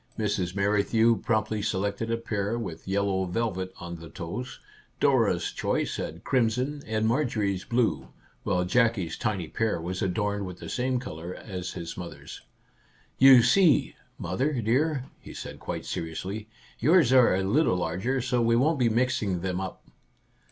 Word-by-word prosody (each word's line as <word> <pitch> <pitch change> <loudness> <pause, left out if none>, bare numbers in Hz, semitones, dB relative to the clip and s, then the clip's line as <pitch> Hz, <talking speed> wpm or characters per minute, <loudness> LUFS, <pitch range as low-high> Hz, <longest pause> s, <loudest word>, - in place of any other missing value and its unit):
Mrs. 90 0 -1
Merrithew 105 +3 +3
promptly 110 -1 0
selected 100 +2 -1
a 115 - +1
pair 110 -1 -2
with 95 -9 -6
yellow 95 -1 0
velvet 95 -1 -2
on 85 0 -6
the 85 0 -11
toes; 90 +10 -6 0.4
Dora's - - +2
choice - - -1
had 85 +3 -5
crimson, 130 +3 0
and 110 0 0
Marjorie's 110 -7 0
blue, 120 -1 0 0.3
while 90 0 0
Jackie's 115 -4 +1
tiny 95 -7 -2
pair 110 +1 -1
was 90 +3 -4
adorned 100 +1 -1
with 90 -1 -8
the - - -8
same 125 0 0
colour 85 -6 -7
as 90 -3 -6
his 85 -1 -6
mother's. 90 -1 -8 0.4
" - - -34
You 125 -3 +9
see, 160 +5 +4 0.2
mother 145 +4 -1
dear," 130 +5 +1
he - - -11
said - - -7
quite - - -5
seri 80 -1 -4
ously, 105 +6 -5
" - - -26
yours 150 -1 +4
are 125 -7 +6
a 95 - 0
little 100 - +2
larger, 95 +11 -1
so 125 0 0
we 115 0 +3
won't 145 +5 +2
be 120 -2 +3
mixing 110 -6 0
them 95 0 -2
up 95 - -6
110 Hz, 160 wpm, -27 LUFS, 95-120 Hz, 0.4 s, You